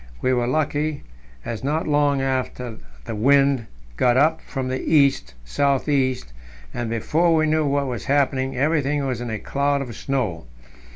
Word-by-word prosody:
We 130 - +1
were 120 -1 +1
lucky, 150 +2 -1 0.4
as 115 0 -5
not 155 +4 -1
long 145 -2 +2
after 125 -3 -3 0.3
the - - -5
wind 135 +2 +3 0.3
got 125 0 +3
up 155 +4 +3
from 135 -3 -5
the 130 0 -2
east 140 - +2
south 140 - 0
east, 130 - 0 0.4
and, 120 -1 -3
before 160 +9 +1
we 155 0 +3
knew 155 -1 +1
what 140 0 +1
was 125 -3 -4
happening, 135 -2 +1
everything 145 0 +1
was 130 -3 -2
in 120 - -4
a 110 - -2
cloud 140 +5 0
of 125 -5 -6
snow. 105 - -3
135 Hz, 165 wpm, -22 LUFS, 125-145 Hz, 0.4 s, wind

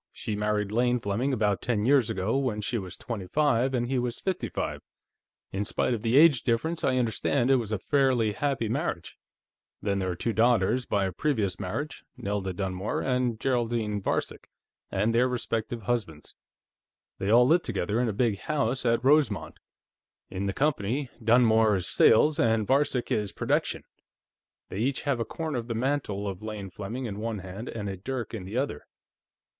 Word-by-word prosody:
She 105 - -4
married 105 -1 -1
Lane 120 +2 +2
Fleming 115 +6 -1
about 105 -5 +1
ten 110 -4 0
years 130 -3 +4
ago, 105 +1 -1
when 130 -6 0
she 115 +3 -1
was 95 -3 -7
twenty 105 -6 -5
five 135 -1 +2
and 120 -1 0
he 130 0 0
was 120 -1 -2
fifty 180 - -2
five. - - -3 0.7
In 100 +1 -1
spite 115 - 0
of 115 - -3
the 115 +3 +2
age 150 -5 +7
difference, 160 +8 -1
I 130 -1 +2
understand 125 +2 +1
it 135 - +6
was 115 -4 -3
a 110 - +1
fairly 130 -1 +2
happy 135 0 -1
marriage. 125 - -3 0.6
Then, 100 -1 -1
there 95 -1 -1
are 90 - -2
two 115 +6 -2
daughters 120 +1 +2
by 100 -1 +1
a 95 - -2
previous 105 - -1
marriage, 140 +11 -4
Nelda 100 -5 -2
Dunmore 95 +2 -3
and 125 -3 0
Geraldine 115 -5 0
Varcek, - - -2 0.4
and 105 +4 +1
their 120 +2 +4
respective 120 -2 -3
husbands. 100 -11 -3 0.9
They 95 - -1
all 120 +3 +6
live 165 +7 +4
together, 105 - -1
in 125 - +1
a - - 0
big 105 -1 0
house 135 -4 -1
at 115 +2 +1
Rosemont. 140 -7 +2 0.7
In 95 +1 -3
the - - 0
company, 135 -1 0
Dunmore 110 -2 +5
is 90 -2 -2
Sales, 155 +1 +4
and 115 -5 +2
Varcek 135 0 +1
is 105 -2 0
Production. - - -1 0.9
They 95 - -5
each 130 +6 0
have 140 -5 0
a 115 - -1
corner 155 +2 -3
of 115 - -7
the 115 - -3
mantle 115 -5 -1
of 95 -1 -5
Lane 105 -3 -6
Fleming 110 +8 -5
in 105 -3 -5
one 115 0 -3
hand 95 +5 -7
and 105 -3 -5
a 95 - -3
dirk 120 +5 -5
in 100 -5 -5
the 105 +6 -4
other. 130 - -2
115 Hz, 180 wpm, -27 LUFS, 105-130 Hz, 0.9 s, age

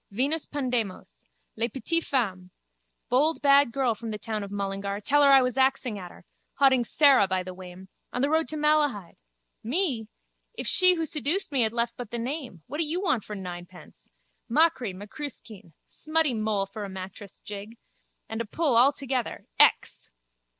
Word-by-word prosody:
Venus 280 +9 0
Pandemos. 245 -9 -4 0.3
Les 230 +1 0
petites 330 +7 -1
femmes. 190 -9 -1 0.6
Bold 295 +6 +3
bad 280 -2 +5
girl 255 -1 +1
from 225 +1 -8
the 215 - -4
town 215 0 -4
of 200 - -7
Mullingar. 200 0 -3
Tell 290 +8 +2
her 285 - +6
I 270 -1 +7
was 250 +1 -1
axing 260 -5 +1
at 180 -2 -8
her. - - -17 0.3
Hauding 265 -3 +4
Sara 265 -4 +5
by 185 -1 -1
the 185 0 -7
wame. 185 0 -11 0.2
On 250 - -2
the 280 - +2
road 320 0 +2
to 310 - -4
Malahide. 295 - +1 0.5
Me? 255 - 0 0.5
If - - -4
she 365 -1 +5
who 330 -1 -2
seduced 310 +4 -1
me 270 -3 +2
had 220 -1 +2
left 235 0 -1
but 245 -4 -7
the 235 - -4
name. 245 - -5
What 295 +5 -6
do - - +2
you 320 +3 -2
want 305 - 0
for 210 - -7
ninepence? 180 -1 -10 0.4
Machree, 260 - +2
macruiskeen. 210 - -9
Smutty 310 -3 0
Moll 215 -3 0
for 210 +2 -8
a 200 - -6
mattress 190 +1 -9
jig. 210 +3 -9 0.5
And 225 +1 -4
a - - -4
pull 285 +3 +1
all 250 +4 +6
together. 260 -3 -3
_Ex! - - +3
240 Hz, 180 wpm, -26 LUFS, 200-285 Hz, 0.6 s, I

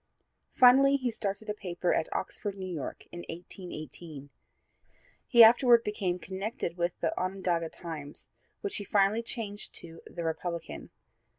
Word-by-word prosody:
Finally 270 +2 +7
he 255 -3 0
started 215 -1 -4
a 210 - -1
paper 180 -3 -1
at - - -1
Oxford, 200 +1 -3
New 190 - -5
York, 170 -7 -5
in 175 - -7
1818. 165 -4 -8 1.0
He 235 -3 +9
afterward 235 +1 +7
became 195 -4 -1
connected 190 +1 -4
with 175 0 -2
the 165 - 0
Onondaga 180 -3 -1
Times, 155 -5 -8 0.3
which 405 -2 -2
he 205 - -3
finally 200 +3 +2
changed 220 -3 -6
to 165 -1 -8
the 170 - -6
Republican. 165 +1 -4
190 Hz, 135 wpm, -30 LUFS, 170-220 Hz, 1.0 s, He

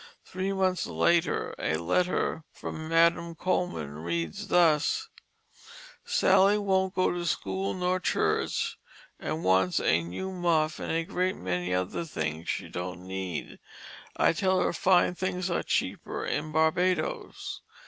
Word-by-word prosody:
Three 190 +1 -3
months 190 -2 0
later 170 -1 +1
a 80 0 0
letter 160 - 0
from 160 0 -7
Madam 170 0 +3
Coleman 80 - -2
read 85 -1 -2
thus: 175 - +2 0.9
"Sally 195 +2 +4
wont 190 -2 +1
go 185 - +2
to 175 0 -3
school 95 - -2
nor 180 0 0
to - - 0
church - - 0 0.4
and 160 +1 -3
wants 95 -1 +3
a 85 - +3
nue 90 - -5
muff 165 -4 +1
and - - -3
a 165 0 +1
great 185 +1 -1
many 90 0 -2
other 90 - -1
things 80 - -4
she - - -2
don't 90 +1 -6
need. 95 -3 -5 0.6
I - - +4
tell 185 +2 +2
her - - +1
fine 180 +1 +3
things 180 0 -2
are 170 - +1
cheaper - - -2
in 155 +1 -2
Barbadoes. 160 +2 0
165 Hz, 140 wpm, -28 LUFS, -, 0.9 s, Sally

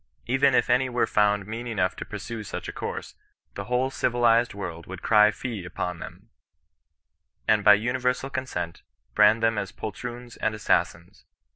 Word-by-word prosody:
Even 135 +2 +3
if - - +3
any 125 +1 +2
were 120 -1 +1
found 105 -1 +2
mean 115 +3 -6
enough 95 -6 0
to - - -6
pursue 115 -2 -6
such 105 - -6
a - - -4
course, - - -5 0.4
the - - -6
whole 125 +2 0
civilized 120 -3 +2
world 85 -4 -6
would 95 -1 -8
cry 105 -1 +6
fie 110 -3 -5
upon 90 0 -4
them, - - -11 1.2
and, 105 -1 +3
by 105 0 +8
universal 125 +4 -1
consent, 90 -11 -4 0.3
brand 110 - +5
them 115 -2 +2
as 100 - -4
poltroons 120 +2 -7
and 110 0 -1
assas 110 - +2
sins. 85 +1 -18
115 Hz, 165 wpm, -26 LUFS, 100-125 Hz, 1.2 s, by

